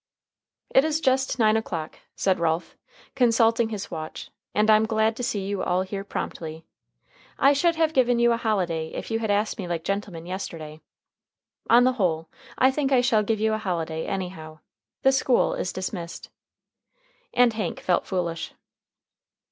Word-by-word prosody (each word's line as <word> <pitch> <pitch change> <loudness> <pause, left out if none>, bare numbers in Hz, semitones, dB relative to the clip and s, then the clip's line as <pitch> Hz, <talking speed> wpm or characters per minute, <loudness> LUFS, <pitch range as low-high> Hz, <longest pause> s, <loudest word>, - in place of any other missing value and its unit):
"It 265 - +5
is 315 0 0
just 265 -3 +1
nine 220 -2 +4
o'clock," 170 -8 -3 0.2
said 190 -2 +1
Ralph, 165 0 -1 0.4
consulting 230 -2 +3
his 210 -3 -5
watch, 155 -2 -7 0.2
"and 210 +1 +3
I'm 215 0 +5
glad 220 0 +1
to - - -4
see 205 -5 -2
you 200 -1 -2
all 180 +1 +1
here 195 +1 -5
promptly. 160 -5 -6 0.7
I 275 +1 +5
should 335 +4 +2
have 320 -1 +1
given 245 -3 +3
you 235 0 +4
a 230 - +2
holiday 180 -8 -1
if - - -6
you 225 - 0
had 220 -1 -2
asked 205 +2 0
me 185 - -4
like 170 -2 -3
gentlemen 195 -4 -3
yesterday. 160 -4 -6 0.9
On 240 +1 +7
the 255 +1 +3
whole, 165 -8 -1 0.3
I 260 +1 +5
think 275 0 -1
I 255 -2 +5
shall 230 -3 +3
give 215 +1 -1
you 220 0 +1
a 215 - -1
holiday, 165 -5 -3
anyhow. 180 -5 -5 0.5
The 265 - +6
school 265 -2 +2
is 185 - -2
dismissed." 185 -2 -6 1.0
And 245 -2 +4
Hank 210 -5 -3
felt 180 - 0
foolish. 170 -3 -3
210 Hz, 165 wpm, -25 LUFS, 175-235 Hz, 1.0 s, On